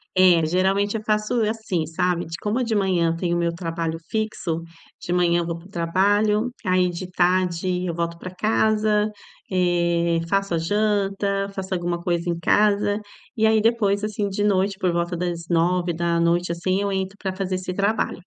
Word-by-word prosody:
É, 180 -3 +5
geralmente 195 +5 +1
eu 215 - -8
faço 215 +2 0
assim, 215 -6 -1
sabe, 175 +2 -1
de 165 +1 -6
como 220 +5 0
de 230 -2 -1
manhã 185 -4 +2
eu - - -2
tenho 170 0 -1
o - - 0
meu 170 0 0
trabalho 165 -1 -3
fixo, 200 -7 -2 0.4
de 175 - -3
manhã 175 -1 +3
eu - - -3
vou 170 0 -3
para 170 +3 -14
o - - -22
trabalho, 205 +5 +1 0.2
aí 185 -1 +3
de 175 +1 -5
tarde 180 0 +1
eu 170 - -2
volto 170 0 -3
para 185 +1 -8
casa, 215 +1 +1 0.4
eh, 170 -2 +1
faço 195 -1 0
a - - +1
janta, 200 +1 0
faço 190 -1 -4
alguma 175 -1 -2
coisa 175 0 -1
em 170 - -1
casa. 205 +3 +2 0.4
E 220 - +2
aí 220 -1 +4
depois, 210 -3 +2
assim, 210 -1 -1
de 200 +1 -2
noite, 195 -1 +1
por 185 -3 +1
volta 170 +1 -1
das 175 -1 -2
21h 170 0 +1
assim, 185 +3 0
eu 200 - -1
entro 190 +1 -2
para 190 -2 -3
fazer 190 -1 -2
esse 185 0 -4
trabalho. 200 +3 0
185 Hz, 185 wpm, -23 LUFS, 170-205 Hz, 0.4 s, É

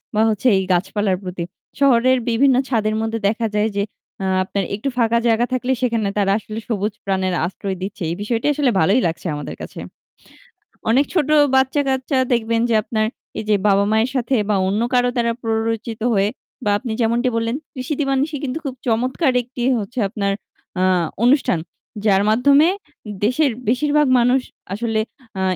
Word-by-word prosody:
বা 215 - +3
হচ্ছে 220 +4 0
এই 190 - 0
গাছপালার 190 +1 0
প্রতি। 180 -1 -4 0.4
শহরের 255 -2 +4
বিভিন্ন 255 +3 +4
ছাদের 215 -3 +1
মধ্যে 225 0 -2
দেখা 225 +2 -1
যায় 210 +1 +2
যে, 200 - +1 0.4
আ - - -1 0.2
আপনার 195 +1 -2
একটু 220 +7 -3
ফাঁকা 235 -1 +3
জায়গা 230 +1 +3
থাকলে 255 +1 0
সেখানে 230 -4 +1
তারা 195 -1 +2
আসলে 215 0 -7
সবুজ 210 -2 -1
প্রাণের 190 -1 0
আশ্রয় 190 +1 -4
দিচ্ছে। 195 0 -6
এই 170 - -2
বিষয়টি 225 +3 -2
আসলে 280 -3 +1
ভালোই 200 +10 +3
লাগছে 170 +2 -4
আমাদের 145 - -6
কাছে। - - -8 1.1
অনেক 275 +4 +4
ছোট 305 -6 +1 0.3
বাচ্চাকাচ্চা 265 0 +1 0.2
দেখবেন 230 -1 +1
যে 225 - +3
আপনার 215 0 0 0.3
এই - - -3
যে 210 - +5
বাবা-মায়ের 210 +4 +3
সাথে 255 +1 +1
বা 205 - +3
অন্য 210 +3 0
কারো 245 0 +3
দ্বারা 235 -1 +1
প্ররোচিত 225 0 -2
হয়ে 200 0 +2 0.4
বা 205 - +3
আপনি 240 -2 -5
যেমনটি 235 +3 +2
বললেন 230 +2 0 0.2
'কৃষি-দিবা 275 +1 -2
নিশি' 300 -2 -4
কিন্তু 255 +3 -3
খুব 265 -2 -3
চমৎকার 255 +5 +1
একটি 245 +1 -9 0.2
হচ্ছে 220 +5 -5
আপনার 200 -2 -1 0.5
আ - - +3 0.4
অনুষ্ঠান 250 - +3 0.5
যার 195 -1 +4
মাধ্যমে 280 +7 +5 0.6
দেশের 265 +4 +2 0.2
বেশিরভাগ 295 +4 +2
মানুষ 250 +2 +3 0.3
আসলে 220 0 -1 0.4
আ - - -1
230 Hz, 160 wpm, -20 LUFS, 210-255 Hz, 1.1 s, যে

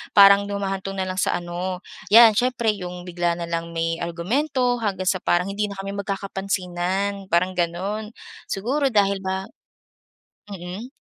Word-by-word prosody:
Parang 200 0 +7
humahantong 195 -1 -3
na 190 - -1
lang 185 0 -3
sa - - +1
ano 175 +1 -4 0.3
'yan, 225 +1 +9
syempre 235 -1 +1
yung 180 -3 -7
bigla 175 -1 -1
na 170 - -4
lang 170 0 -3
may 165 +1 -1
argumento 245 - 0
hanggang 195 -4 -2
sa 185 -1 0
parang 175 +1 +2
hindi 210 0 -1
na 200 - -8
kami 195 +1 -5
magkakapansinan, 195 -1 -2
parang 180 +2 +2
ganon. 185 +5 -2 0.4
Siguro 270 +8 0
dahil 200 -4 +2
ba 190 0 -2 1.0
mm. 190 +3 -7
195 Hz, 145 wpm, -23 LUFS, 180-205 Hz, 1.0 s, yan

